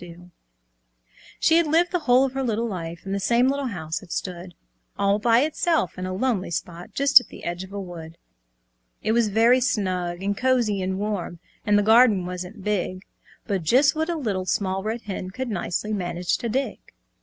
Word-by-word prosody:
She 325 Hz, -, +4 dB
had 335 Hz, -2 st, +3 dB
lived 335 Hz, +3 st, +2 dB
the 360 Hz, -, +1 dB
whole 260 Hz, -3 st, +4 dB
of 270 Hz, -, -3 dB
her 270 Hz, -, -2 dB
little 235 Hz, -2 st, -1 dB
life, 170 Hz, -4 st, -6 dB
In 195 Hz, -, -5 dB
the 200 Hz, -, -1 dB
same 235 Hz, +5 st, +3 dB
little 280 Hz, 0 st, -1 dB
house; 160 Hz, -7 st, -4 dB
it 170 Hz, -, -14 dB
stood 180 Hz, -1 st, -5 dB, 0.4 s
All 200 Hz, +1 st, +2 dB
by 230 Hz, +2 st, +4 dB
itself, 310 Hz, -, 0 dB
in 185 Hz, 0 st, -5 dB
a -, -, -4 dB
lonely 210 Hz, -4 st, -1 dB
spot, 170 Hz, 0 st, -5 dB
Just 280 Hz, -2 st, +7 dB
at -, -, -15 dB
the -, -, -12 dB
edge 175 Hz, +2 st, -4 dB
of 190 Hz, -, -12 dB
a 200 Hz, -, -5 dB
wood. 170 Hz, -3 st, -9 dB, 0.9 s
It -, -, +1 dB
was 230 Hz, -1 st, +3 dB
very 230 Hz, +5 st, +4 dB
snug 185 Hz, -6 st, -1 dB
and 200 Hz, +1 st, 0 dB
cosy 240 Hz, -5 st, +1 dB
and 185 Hz, 0 st, -2 dB
warm, 200 Hz, -4 st, -3 dB, 0.3 s
And 205 Hz, 0 st, +4 dB
the 205 Hz, -, +3 dB
garden 220 Hz, -3 st, +5 dB
wasn't 180 Hz, +3 st, -7 dB
big, 185 Hz, -2 st, -2 dB, 0.4 s
But 195 Hz, -3 st, -1 dB
just 255 Hz, -, +4 dB
what 315 Hz, +2 st, -1 dB
a 340 Hz, -, 0 dB
Little 200 Hz, -, -2 dB
Small 190 Hz, +1 st, 0 dB
Red 220 Hz, +3 st, -4 dB
Hen 190 Hz, -2 st, -5 dB
Could 255 Hz, +6 st, -5 dB
nicely 210 Hz, +1 st, -2 dB
manage 175 Hz, -2 st, -1 dB
to 235 Hz, -, -3 dB
dig. 265 Hz, +5 st, -2 dB
205 Hz, 195 wpm, -24 LUFS, 185-250 Hz, 0.9 s, Just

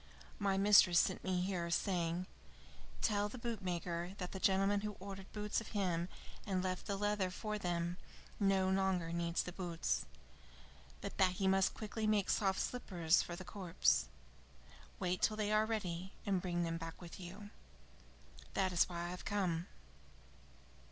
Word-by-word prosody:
My 195 Hz, -2 st, +2 dB
mistress 195 Hz, -3 st, +7 dB
sent 185 Hz, -, +3 dB
me 185 Hz, -1 st, +1 dB
here, 180 Hz, -2 st, -1 dB
saying: 175 Hz, -1 st, 0 dB, 0.8 s
'Tell 205 Hz, -1 st, +2 dB
the 255 Hz, -, -8 dB
bootmaker 180 Hz, -6 st, -3 dB
that 180 Hz, -3 st, -4 dB
the 190 Hz, -, -5 dB
gentleman 195 Hz, +1 st, +3 dB
who 210 Hz, 0 st, -3 dB
ordered 195 Hz, 0 st, -8 dB
boots 210 Hz, +1 st, -1 dB
of 225 Hz, -, -9 dB
him 175 Hz, -3 st, 0 dB, 0.3 s
and 185 Hz, -3 st, -1 dB
left 185 Hz, -1 st, -2 dB
the 200 Hz, -, -1 dB
leather 205 Hz, -2 st, +1 dB
for 210 Hz, +3 st, -3 dB
them 175 Hz, -1 st, -1 dB, 0.4 s
no 195 Hz, -2 st, +3 dB
longer 190 Hz, -3 st, +1 dB
needs 170 Hz, 0 st, 0 dB
the 180 Hz, -, -5 dB
boots, 170 Hz, -, -1 dB, 0.9 s
but 200 Hz, -, -6 dB
that 185 Hz, -1 st, +5 dB
he 190 Hz, +1 st, 0 dB
must 190 Hz, 0 st, +3 dB
quickly 215 Hz, 0 st, -3 dB
make 210 Hz, -2 st, +3 dB
soft 195 Hz, -2 st, +2 dB
slippers 180 Hz, -9 st, +2 dB
for 175 Hz, -, -5 dB
the 185 Hz, +1 st, -8 dB
corpse. 165 Hz, -, +2 dB, 0.9 s
Wait 180 Hz, -1 st, 0 dB
till 215 Hz, -, +2 dB
they 210 Hz, -1 st, 0 dB
are 215 Hz, 0 st, +4 dB
ready, 190 Hz, -4 st, -3 dB
and 195 Hz, -3 st, +1 dB
bring 175 Hz, -1 st, -1 dB
them 165 Hz, 0 st, -1 dB
back 165 Hz, 0 st, -7 dB
with 175 Hz, +2 st, -9 dB
you.' 195 Hz, +3 st, -8 dB, 1.0 s
That 190 Hz, -1 st, +2 dB
is 175 Hz, -, +4 dB
why 170 Hz, -1 st, -4 dB
I 175 Hz, -, -3 dB
have 180 Hz, +1 st, -6 dB
come." 180 Hz, -4 st, 0 dB
185 Hz, 160 wpm, -37 LUFS, 175-205 Hz, 1.0 s, mistress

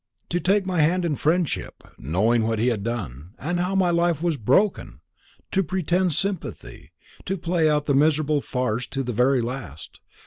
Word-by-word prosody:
"To 175 Hz, -, 0 dB
take 195 Hz, +2 st, +2 dB
my 185 Hz, -2 st, -1 dB
hand 175 Hz, +4 st, +2 dB
in 155 Hz, -3 st, 0 dB
friendship, 165 Hz, +3 st, -1 dB, 0.2 s
knowing 105 Hz, -, +1 dB
what 115 Hz, 0 st, 0 dB
he 120 Hz, +4 st, +2 dB
had 110 Hz, -4 st, -1 dB
done, 95 Hz, -, -5 dB
and 175 Hz, +5 st, -2 dB
how 180 Hz, +2 st, -1 dB
my 185 Hz, -2 st, +3 dB
life 170 Hz, -2 st, +1 dB
was 170 Hz, -2 st, +1 dB
broken! 140 Hz, -, +1 dB, 0.5 s
to 195 Hz, -, +2 dB
pretend 180 Hz, 0 st, 0 dB
sympathy; 195 Hz, +2 st, -4 dB, 0.4 s
to 195 Hz, +1 st, -2 dB
play 165 Hz, -2 st, +1 dB
out 150 Hz, -1 st, +1 dB
the 140 Hz, -, +1 dB
miserable 150 Hz, +1 st, +2 dB
farce 125 Hz, -3 st, -2 dB
to 135 Hz, 0 st, -3 dB
the 125 Hz, -1 st, -3 dB
very 125 Hz, +3 st, +3 dB
last! 115 Hz, -, -7 dB
150 Hz, 175 wpm, -24 LUFS, 120-175 Hz, 0.5 s, my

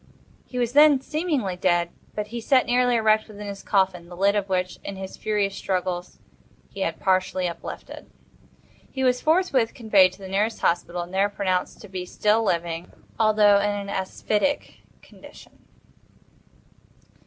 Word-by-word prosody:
He 250 Hz, -, -7 dB
was 240 Hz, -1 st, 0 dB
then 295 Hz, -1 st, +7 dB
seemingly 295 Hz, -, -2 dB
dead; 175 Hz, -1 st, +1 dB, 0.2 s
but 210 Hz, 0 st, -4 dB
he 235 Hz, +1 st, -5 dB
sat 255 Hz, +2 st, +3 dB
nearly 245 Hz, 0 st, +2 dB
erect 220 Hz, -1 st, +3 dB
within 210 Hz, -1 st, -9 dB
his 200 Hz, -1 st, -7 dB
coffin, 190 Hz, -3 st, 0 dB
the 175 Hz, -, -10 dB
lid 200 Hz, +2 st, +3 dB
of 200 Hz, -1 st, -1 dB
which, 185 Hz, -1 st, -1 dB
in 200 Hz, -, -6 dB
his 190 Hz, 0 st, -7 dB
furious 205 Hz, -2 st, -1 dB
struggles, 180 Hz, -1 st, -3 dB, 0.5 s
he -, -, -10 dB
had -, -, -2 dB
partially 185 Hz, -1 st, +1 dB
uplifted. 170 Hz, -, -8 dB, 0.8 s
He 265 Hz, -, -4 dB
was 250 Hz, -1 st, +2 dB
forthwith 310 Hz, -8 st, +2 dB
conveyed 200 Hz, -6 st, +4 dB
to -, -, -15 dB
the -, -, -6 dB
nearest 210 Hz, +4 st, -1 dB
hospital, 175 Hz, 0 st, 0 dB
and 175 Hz, +2 st, -12 dB
there 195 Hz, +2 st, +2 dB
pronounced 185 Hz, -3 st, -2 dB
to 210 Hz, -, -11 dB
be 185 Hz, -2 st, -6 dB
still 210 Hz, +4 st, +2 dB
living, 170 Hz, -3 st, -2 dB, 0.3 s
although 210 Hz, -2 st, +5 dB
in 205 Hz, +1 st, +1 dB
an 200 Hz, -1 st, -4 dB
asphytic 210 Hz, +7 st, -2 dB, 0.2 s
condition. -, -, -16 dB
200 Hz, 155 wpm, -24 LUFS, 185-225 Hz, 0.8 s, then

